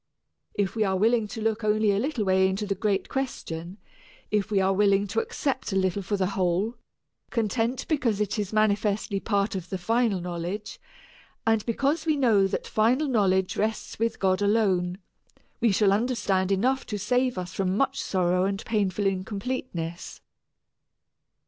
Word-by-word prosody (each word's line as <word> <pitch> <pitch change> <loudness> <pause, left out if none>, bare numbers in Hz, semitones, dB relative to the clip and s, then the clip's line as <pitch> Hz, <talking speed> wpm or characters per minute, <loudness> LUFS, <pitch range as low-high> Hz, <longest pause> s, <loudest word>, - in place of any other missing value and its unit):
If 200 0 -1
we 220 - +2
are 190 -2 +1
willing 225 +2 +2
to 220 +1 -6
look 220 0 0
only 215 0 +3
a 200 - +1
little 250 -3 -1
way 190 0 +4
into 195 +3 -2
the 200 - 0
great 200 0 -1
question, 180 -9 -4 0.5
if 210 -1 +1
we 205 -2 +2
are 190 0 +2
willing 200 0 +3
to 205 +3 -1
accept 265 0 -2
a - - -2
little 190 +1 +1
for 200 +2 -2
the 190 - +1
whole, 190 +4 0 0.6
content 230 +2 -1
because 250 -10 +1
it 210 +1 -1
is 205 -2 -2
manifestly 210 -1 +1
part 200 0 0
of 185 -2 -5
the 190 - -2
final 225 +1 +1
knowledge, 175 +4 -5 0.7
and 225 -1 +2
because 280 +7 0
we 310 - +3
know 220 -8 +4
that - - -3
final 245 +8 +2
knowledge 190 -7 +2
rests 220 0 -2
with 230 0 0
God 190 0 +1
alone, 195 -4 +2 0.6
we 230 - +3
shall 195 0 +3
understand 205 -4 0
enough 255 +7 +1
to 210 - -3
save 250 +3 0
us 180 -1 -5
from 190 0 0
much 275 - +1
sorrow 180 -1 +1
and 195 +1 -2
painful 205 -3 0
incompleteness. 195 -3 -3
205 Hz, 165 wpm, -26 LUFS, 190-225 Hz, 0.7 s, way